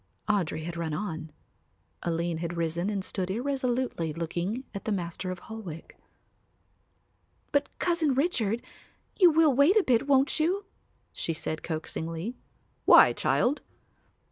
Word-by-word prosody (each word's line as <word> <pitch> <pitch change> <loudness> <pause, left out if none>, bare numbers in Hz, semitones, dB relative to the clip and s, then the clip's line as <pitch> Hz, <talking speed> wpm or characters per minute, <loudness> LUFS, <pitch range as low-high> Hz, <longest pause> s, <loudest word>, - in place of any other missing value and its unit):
Audry 180 -7 0
had 170 +1 -5
run 160 -2 -2
on. 160 -4 -4 0.7
Aline 170 -1 -1
had 170 0 -4
risen 170 +3 -1
and 200 -2 -2
stood 185 -2 -3
irresolutely 250 - -1
looking 175 - -3
at 200 - -6
the 220 - -1
Master 180 -1 -3
of 185 - -3
Holwick. 190 -8 -8 1.6
"But, 285 -1 +2
Cousin 335 -6 +1
Richard, 240 - +1 0.6
you 360 -3 +8
will 315 -2 +4
wait 285 - +5
a 430 - +5
bit, 250 -1 +2
won't 275 +2 +3
you?" 370 +6 +1 0.5
she 165 - -2
said 155 0 -4
coaxingly. 165 +5 -4 0.5
"Why, - - +8
child?" 275 +5 +1
200 Hz, 130 wpm, -28 LUFS, 170-270 Hz, 1.6 s, you